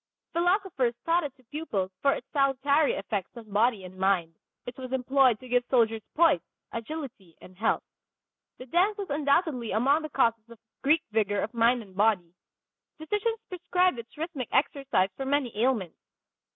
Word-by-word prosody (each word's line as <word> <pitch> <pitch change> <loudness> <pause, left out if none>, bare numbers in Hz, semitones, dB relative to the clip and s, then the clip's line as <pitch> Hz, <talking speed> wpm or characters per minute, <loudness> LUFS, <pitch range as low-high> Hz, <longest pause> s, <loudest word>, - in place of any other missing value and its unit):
Philosophers 345 - +1
taught 335 +1 +3
it 280 -3 -5
to 255 - -24
pupils 225 -9 -3
for 275 -1 +4
its - - -6
salutary 280 +1 +2
effect 200 +2 -4
on 230 -2 -10
body 215 0 +2
and 185 0 -10
mind; 185 -4 +1 0.3
it 245 - -7
was 255 -1 -7
employed 260 -2 +3
to 255 - -12
give 245 0 +2
soldiers 225 -3 +3
poise, 325 - +4 0.3
agility 230 - -7
and 185 - -15
health. 220 +4 0 0.7
The 255 - -9
dance 365 - +2
was 395 -6 -5
undoubtedly 285 - +1
among 270 +8 +3
the 310 - -5
causes 230 -5 +1
of 235 - -13 0.2
Greek 305 +4 +3
vigor 205 -2 +1
of 220 - -4
mind 235 +1 +3
and 190 -3 -18
body. 195 -5 +2 0.6
Physicians 420 +8 -1
prescribed 360 -4 +1
its 235 +5 -11
rhythmic 305 -6 -4
exercise 270 -8 +1
for 270 - -4
many 270 -5 0
ailments. 220 -6 0
255 Hz, 165 wpm, -28 LUFS, 220-300 Hz, 0.7 s, for